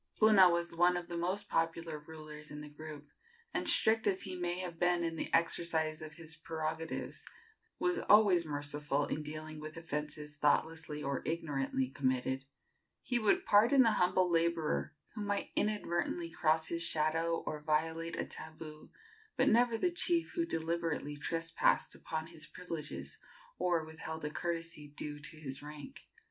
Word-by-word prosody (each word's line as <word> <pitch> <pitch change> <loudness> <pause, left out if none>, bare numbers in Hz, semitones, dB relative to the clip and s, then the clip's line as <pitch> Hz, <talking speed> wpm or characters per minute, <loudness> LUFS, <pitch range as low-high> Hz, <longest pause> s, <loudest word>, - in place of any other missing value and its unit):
Puna 210 -4 +7
was 170 0 0
one 175 +1 +4
of 175 0 -6
the 170 - -4
most 180 +4 -1
popular 165 -1 -1
rulers 150 0 -10
in 150 0 -7
the 150 - -8
group, 150 -1 -8 0.5
and, - - +1
strict 225 0 +4
as 195 -2 +1
he 185 -1 -5
may 175 0 -1
have 175 -3 -5
been 175 -1 +3
in 165 -1 -1
the - - -3
exercise 165 -1 +2
of 155 -1 -7
his 165 0 -6
prerogatives, 160 0 -4 0.5
was 355 0 +1
always 205 -5 +7
merciful 145 -1 -1
in 155 - -3
dealing 155 +1 -6
with 155 +1 -7
offences 150 -2 -4
thoughtlessly 150 0 +1
or 140 -1 -1
ignorantly 140 -5 -1
committed. 130 0 -1 0.6
He 245 -2 0
would 290 - +3
pardon 235 +6 +6
the 225 - +4
humble 185 -2 +3
laborer 165 -2 +1 0.2
who 215 - -5
might 205 -1 -1
inadvertently 175 -5 -1
cross 160 -1 +2
his 170 0 -1
shadow 165 +1 +3
or 150 -1 -4
violate 160 +2 0
a - - 0
tabu, 155 -1 -8 0.5
but - - +4
never 235 0 +4
the 355 +9 +1
chief 340 -1 +2
who 335 -2 0
deliberately 165 - -2
trespassed 165 +2 +1
upon 160 0 -4
his 160 -2 -8
privileges 165 -4 -6 0.4
or 170 -3 +1
withheld 160 0 -6
a 150 - -2
courtesy 165 -2 -3
due 145 0 -6
to 155 +2 -7
his 135 -3 -6
rank. 145 -1 -10
165 Hz, 155 wpm, -34 LUFS, 150-175 Hz, 0.6 s, Puna